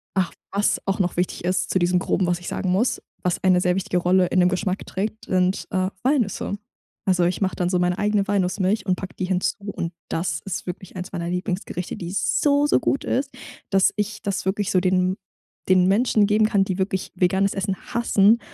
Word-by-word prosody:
ach, 185 -2 +1 0.2
was 200 +1 +1
auch 195 +1 0
noch 180 -2 0
wichtig 180 -1 -1
ist 185 +1 0
zu - - +1
diesem 180 0 +2
Groben, 185 - 0
was 175 0 0
ich 175 - -9
sagen 185 -2 -2
muss, 220 +7 +1 0.2
was 180 -1 0
eine 185 -1 +4
sehr 180 0 +2
wichtige 180 -1 -1
Rolle 180 +1 +3
in 185 - +1
dem 180 0 +5
Geschmack 185 +1 -2
trägt, 215 +3 -4
sind, 185 0 +1
äh, 185 0 0
Walnüsse. 245 -6 0 0.5
Also, 180 -3 +3
ich 180 +3 -1
mache 190 -1 0
dann 180 -1 0
so 180 - +1
meine 180 +1 +1
eigene 205 -1 +1
Walnussmilch 195 +1 0
und 185 - +3
packe 190 - -7
die 185 - -2
hinzu 185 +2 0 0.2
und 170 +1 -4 0.2
das 170 +3 -2
ist 195 - -4
wirklich 180 +1 -7
eins 180 +1 -6
meiner 170 -2 -3
Lieblingsgerichte, 180 0 -3
die 175 0 -6
so, 285 +8 +2
so - - +3
gut 275 - 0
ist, 270 +2 0 0.4
dass 195 -1 +4
ich 210 +1 -2
das 200 -2 -2
wirklich 200 +1 0
so 185 - +4
den 185 0 +2 0.5
den 185 -1 +5
Menschen 215 +1 +3
geben 210 +1 +3
kann, 200 -2 +3
die 190 -1 -3
wirklich 190 0 -2
veganes 190 +2 +2
Essen 195 0 -1 0.2
hassen 225 -1 +4
190 Hz, 205 wpm, -23 LUFS, 180-200 Hz, 0.5 s, dem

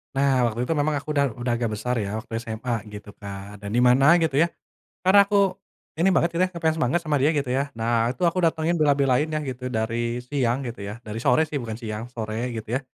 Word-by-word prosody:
Nah, 135 -3 +3
waktu 115 0 -4
itu 145 - 0
memang 150 +1 +1
aku 145 +1 -5
udah 140 -2 +2
udah 120 0 -2
agak 115 -1 -1
besar 125 +4 -2
ya, 105 +1 -3
waktu 115 - -14
SMA 115 +1 -4
gitu 105 0 -10
kan. 100 0 -8
Dan 100 0 -7
di 120 - +4
mana 135 +6 +6
gitu 150 -4 +1
ya, 170 - +5 0.6
karena 200 +2 +7
aku 200 -2 +2 0.4
ini 170 +4 +3
banget 170 -1 +3
gitu 170 +2 +1
ya, 185 - -2
nge-fans 160 -2 0
semangat 160 +2 +1
sama 155 -2 +1
dia 145 +3 +4
gitu 145 -4 -1
ya. 140 +2 -1
Nah, 115 +1 +1
itu 130 - -10
aku 175 - -2
datengin, 165 +1 +1
bela-belain 140 -1 +3
ya, 155 -1 -2
gitu, 125 -1 -5
dari 115 +1 -1
siang 125 -1 0
gitu 120 -3 -6
ya, 100 +1 -5
dari 110 +1 -5
sore 125 +5 +3
sih, 150 - -4
bukan 110 -2 -5
siang, 110 -1 -5
sore 115 0 -4
gitu 110 -1 -6
ya. - - -1
125 Hz, 230 wpm, -24 LUFS, 115-155 Hz, 0.6 s, karena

